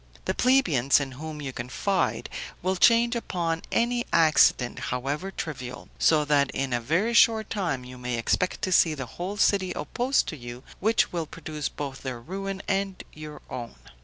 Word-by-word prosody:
The - - 0
plebeians, 170 - +3
in 140 -2 -4
whom 150 +3 -7
you 135 -2 -5
confide, 135 - -1 0.4
will 185 +1 +1
change 235 +4 +4
upon 170 -7 -2
any 240 +1 +1
accident, 155 -6 +4
however 140 +9 -2
trivial; 130 -9 -6
so 155 -2 +4
that 145 -2 +3
in 135 -2 -1
a 120 - 0
very 170 - +1
short 220 -2 +4
time 175 - -1
you 125 0 -10
may 125 -1 -2
expect 180 +10 0
to 185 - 0
see 165 -3 +4
the 135 -3 -5
whole 180 - -6
city 195 -3 +2
opposed 260 +3 0
to 160 - -5
you, 120 -1 -9 0.2
which 220 +3 +2
will 165 -3 -2
produce 155 -2 -5
both 140 -2 -6
their 130 -3 -5
ruin 195 +8 -5
and 195 -1 -1
your 150 -1 -9
own. 120 - -7
155 Hz, 170 wpm, -26 LUFS, 130-195 Hz, 0.4 s, change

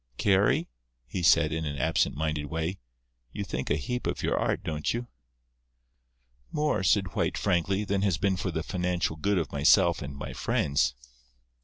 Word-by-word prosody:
"Carry," 100 0 +3 0.4
he 90 +9 -4
said, 80 -1 +5
in 80 0 -2
an 70 -2 -3
absent 70 - +1
minded 75 -1 -2
way, 80 +5 -3 0.5
"you 100 - -3
think 65 -9 -4
a 75 - +3
heap 125 - -3
of - - -3
your - - +1
art, - - 0
don't 75 -1 -2
you?" 120 +1 -3 1.5
"More," 150 -7 0
said 95 -3 +2
White, - - 0
frankly, 95 +3 +1
"than 100 -1 -1
has 100 -5 +1
been 95 +2 +1
for 95 +1 -3
the 80 -2 -3
financial 90 -3 -1
good 100 +5 0
of 80 -6 -1
myself 75 +3 +4
and 70 0 -6
my - - -6
friends." 70 -3 +1
85 Hz, 170 wpm, -28 LUFS, 75-95 Hz, 1.5 s, said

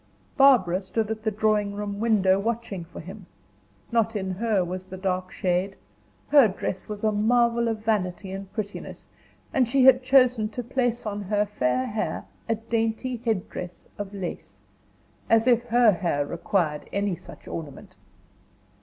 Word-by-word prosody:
Barbara 235 -11 +5
stood 215 +3 -2
at 220 0 -4
the 220 - 0
drawing 210 -1 +1
room 205 -1 -4
window 200 -4 +3
watching 225 -4 -3
for 170 - -11
him. 190 +3 -10 0.6
Not 225 -1 +1
in 190 -2 -2
her 200 -1 0
was 185 +1 -5
the 190 0 -9
dark 185 -1 -2
shade; 185 +2 -1 0.5
her 285 -5 +7
dress 190 -1 -5
was 210 0 -6
a 215 - +3
marvel 235 +2 +2
of 220 -1 -3
vanity 190 -3 -1
and 195 0 -7
prettiness, 205 -2 -6 0.5
and 255 -3 +3
she 265 +2 +3
had 260 -1 +7
chosen 255 -4 +4
to 245 +3 -5
place 245 -1 -1
on 205 -1 -3
her 205 +1 0
fair 130 -10 0
hair 215 0 -3 0.2
a 225 - +3
dainty 225 +2 -2
headdress 185 -5 -3
of 200 -1 -5
lace 190 -4 -7 0.7
as 225 0 +4
if 240 -1 +3
her 240 -1 +5
hair 170 -6 -1
required 165 -2 -1
any 200 -2 0
such 175 - -14
ornament! 165 +5 -8
210 Hz, 155 wpm, -25 LUFS, 185-230 Hz, 0.7 s, her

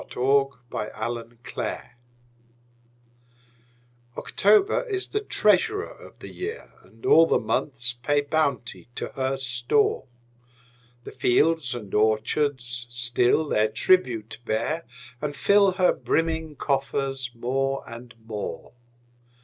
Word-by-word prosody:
Paul 135 +2 +1
Laurence 105 - -4
Dunbar 115 +1 -4 0.2
October - - -5 2.2
OCTOBER 395 - +3
is 390 -2 -2
the 420 - -1
treasurer 425 0 +2
of - - -15
the - - -10
year, 440 +5 -7
And - - -16
all 165 - +7
the - - +3
months 125 -3 0
pay 145 +3 +2
bounty 140 -6 -2
to - - -4
her 135 0 -2
store: 125 +2 +1 1.0
The - - -9
fields 145 0 +2
and 105 -5 -8
orchards 120 +3 0
still 120 +4 +1
their 110 -5 +2
tribute 115 - +1
bear, 120 +9 -2 0.4
And 145 -1 -3
fill 200 +1 +4
her 185 -1 +3
brimming 160 -1 -1
coffers 135 -2 -2
more 135 +3 -1
and 120 +1 -10
more. 110 0 -6
135 Hz, 110 wpm, -25 LUFS, 120-160 Hz, 2.2 s, all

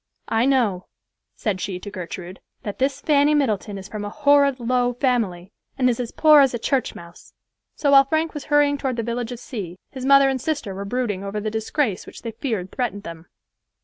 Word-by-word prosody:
"I 225 +3 +2
know," 225 -9 +1 0.5
said 195 -4 -2
she 185 -1 -3
to 205 +2 -8
Gertrude, 185 -1 -7 0.2
"that 205 - -6
this 275 +1 0
Fanny 295 0 +3
Middleton 215 -7 0
is 190 0 -8
from 210 0 -6
a 205 - -4
horrid 285 0 +3
low 245 +1 +1
family, 225 -8 -1 0.3
and 255 - +3
is 235 - -4
as 240 -2 -3
poor 305 -2 +6
as 270 -3 +3
a - - -1
church 260 +2 -1
mouse." 170 0 -13 0.4
So 285 - +1
while 275 -1 +8
Frank 315 +3 0
was 295 -3 -6
hurrying 290 -1 +3
toward 265 -3 -1
the 230 - -2
village 235 +1 -3
of 245 - -5
C——, 195 -8 -7
his 260 -2 -7
mother 275 0 +7
and 265 -2 -1
sister 285 -10 -2
were 195 +1 -6
brooding 210 -3 -2
over 200 +1 -3
the 215 +1 -3
disgrace 220 0 -1
which - - -11
they 230 - -4
feared 220 -6 -4
threatened 215 -6 -3
them. 165 -2 -9
240 Hz, 210 wpm, -22 LUFS, 200-275 Hz, 0.5 s, while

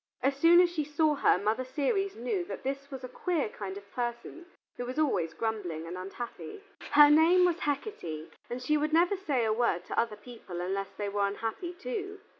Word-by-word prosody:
As 275 0 +2
soon 330 +5 +6
as 355 -1 +3
she 320 -3 -1
saw 300 +1 +2
her, 285 - +3
Mother 215 +6 0
Ceres 300 - -1
knew 250 - -2
that - - -7
this 275 +1 -4
was 265 -2 -7
a - - -4
queer 310 - -1
kind 195 -2 -6
of 200 0 -13
person 240 +8 -4 0.3
who 245 - -4
was 255 - -5
always 185 - +1
grumbling 195 -8 -3
and 170 +2 -6
unhappy. 235 - -7 0.3
Her 295 0 +9
name 335 +4 +6
was 350 -1 +1
Hecate, 225 - -4 0.2
and 250 +1 -5
she 300 +4 +2
would 305 +1 -1
never 345 +4 +4
say 285 -11 0
a 215 - +2
word 220 -7 0
to - - -1
other 230 -2 0
people 210 -5 -9
unless 195 +2 -2
they 205 - -2
were 200 0 +1
unhappy 225 - -4
too. 405 0 -5
260 Hz, 205 wpm, -30 LUFS, 205-325 Hz, 0.3 s, Her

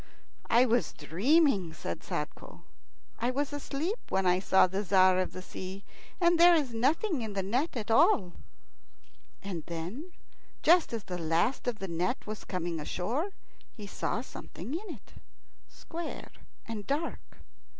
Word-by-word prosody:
"I 240 +2 +6
was 240 -1 +1
dreaming," 200 - +2
said - - -5
Sadko; - - -6 0.6
"I 240 - +1
was 280 +3 -1
asleep 295 - -2
when 190 0 +1
I 180 0 +4
saw 190 0 +5
the 190 +3 -2
Tzar 185 -1 +5
of 185 - -1
the 185 - -8
Sea, 190 +2 -7 0.4
and 345 -1 +4
there 345 0 +8
is 280 -7 0
nothing 285 - +1
in 220 -2 -4
the 195 -1 -1
net 250 - -1
at 220 -1 -3
all." 225 - +4 1.1
And 180 -5 -4
then, 180 - -5 0.5
just 345 -2 +5
as 230 -3 -3
the 180 -1 -5
last 170 +12 +1
of 240 -3 0
the 195 - -5
net 175 +8 -1
was 215 0 -6
coming 175 -3 -3
ashore, 225 - -2 0.4
he 210 - -9
saw 210 +3 -2
something 240 - -8
in 350 -1 -4
it, 205 - -20 0.5
square 335 0 -7 0.3
and 215 -3 -6
dark. 300 +4 -3
225 Hz, 150 wpm, -30 LUFS, 185-290 Hz, 1.1 s, there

